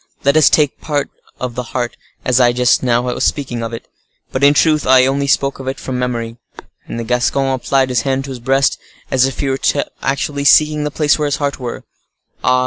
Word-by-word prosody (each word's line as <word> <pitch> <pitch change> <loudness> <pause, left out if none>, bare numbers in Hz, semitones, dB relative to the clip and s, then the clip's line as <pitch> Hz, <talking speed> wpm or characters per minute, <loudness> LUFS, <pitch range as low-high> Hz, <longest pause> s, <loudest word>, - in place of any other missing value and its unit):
let 140 +1 +3
us 155 -2 +6
take 150 -3 +2
the - - -25
part 145 -2 -1 0.3
of 125 -1 -4
the 125 - -3 0.2
heart, 120 -1 -2 0.3
as 125 0 +3
I 120 -1 +4
just 125 0 +2
now 120 -1 +1
was 125 0 -2
speaking 130 -5 -1
of 115 0 -4
it. 115 - -8 0.4
But 130 - -2
in 145 +1 +6
truth, 155 0 +2
I 130 0 +6
only 140 +1 0
spoke 140 0 +1
of 135 - -8
it 135 - -3
from 130 -1 -4
memory." 120 -2 -3 0.5
And 115 - -5
the - - -3
Gascon 125 +3 0
applied 130 +1 0
his 125 -2 +1
hand 135 +1 -1
to 135 - -7
his 130 - -7
breast, 135 +3 +1 0.3
as 130 0 +3
if 135 - -5
he 140 - -1
were 135 0 -1 0.4
actually 140 +1 -2
seeking 150 +1 +4
the - - -1
place 150 +1 +1
where 150 - 0
his 145 -1 -1
heart 140 -1 -2
was. 120 -2 -6 0.6
"Ah! 130 0 +3
135 Hz, 225 wpm, -16 LUFS, 125-140 Hz, 0.6 s, us